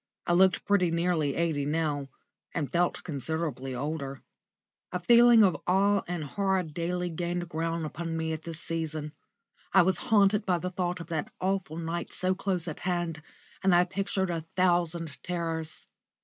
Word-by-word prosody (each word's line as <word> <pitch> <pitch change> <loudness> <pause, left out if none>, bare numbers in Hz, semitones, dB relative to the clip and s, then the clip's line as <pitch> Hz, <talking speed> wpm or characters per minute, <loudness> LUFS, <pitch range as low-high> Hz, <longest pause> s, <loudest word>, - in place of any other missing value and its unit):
I 175 - +2
looked 185 +1 +4
pretty 200 -4 +3
nearly 165 -4 +1
eighty 160 -4 0
now, 145 -2 -1 0.5
and 150 -4 -2
felt 175 0 +1
considerably 145 -3 -3
older. 140 0 -4 0.7
A 180 - -2
feeling 235 +3 +7
of 185 -4 +2
awe 200 +2 +3
and 175 -2 -3
horror 190 +5 0
daily 175 +2 -3
gained 175 +1 -2
ground 165 0 -2
upon 165 +1 -4
me 160 0 -1
at 160 - -5
this 165 -1 -7
season. 155 -2 -3 0.6
I 190 - +8
was 190 +2 +2
haunted 210 -1 +4
by 180 -2 +1
the 180 +2 -4
thought 180 -1 -2
of 165 - -8
that 160 -3 -2
awful 190 -4 -1
night 170 +1 -3
so 185 +1 0
close 185 -3 -1
at 155 - -5
hand, 175 -3 -2 0.4
and 190 -2 +4
I 175 - +6
pictured 190 0 -1
a 165 -2 -3
thousand 175 -4 +1
terrors. 165 -3 -3
170 Hz, 165 wpm, -29 LUFS, 160-185 Hz, 0.7 s, I